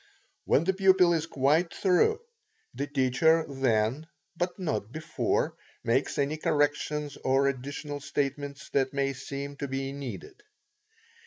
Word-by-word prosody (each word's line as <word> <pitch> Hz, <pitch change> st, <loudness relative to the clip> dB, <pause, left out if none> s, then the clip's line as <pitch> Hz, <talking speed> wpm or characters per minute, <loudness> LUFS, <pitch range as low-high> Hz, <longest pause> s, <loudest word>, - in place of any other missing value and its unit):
When 145 Hz, -, +3 dB
the 190 Hz, +3 st, +1 dB
pupil 190 Hz, -2 st, +5 dB
is 165 Hz, -1 st, -1 dB
quite 155 Hz, +4 st, +2 dB
through, 205 Hz, -, +2 dB, 0.5 s
the 140 Hz, -, -3 dB
teacher 145 Hz, +4 st, +3 dB
then, 130 Hz, +1 st, 0 dB, 0.3 s
but 175 Hz, +2 st, -2 dB
not 110 Hz, -, -2 dB
before, 155 Hz, +3 st, -1 dB, 0.3 s
makes 120 Hz, +4 st, +1 dB
any 145 Hz, +2 st, 0 dB
corrections 150 Hz, -1 st, 0 dB
or 135 Hz, +1 st, +3 dB
additional 140 Hz, +2 st, -4 dB
statements 140 Hz, 0 st, -3 dB
that 135 Hz, -1 st, +1 dB
may 135 Hz, 0 st, +1 dB
seem 140 Hz, +1 st, -6 dB
to 140 Hz, -, -3 dB
be 135 Hz, 0 st, -3 dB
needed. 140 Hz, -, -8 dB
145 Hz, 130 wpm, -28 LUFS, 135-160 Hz, 0.5 s, pupil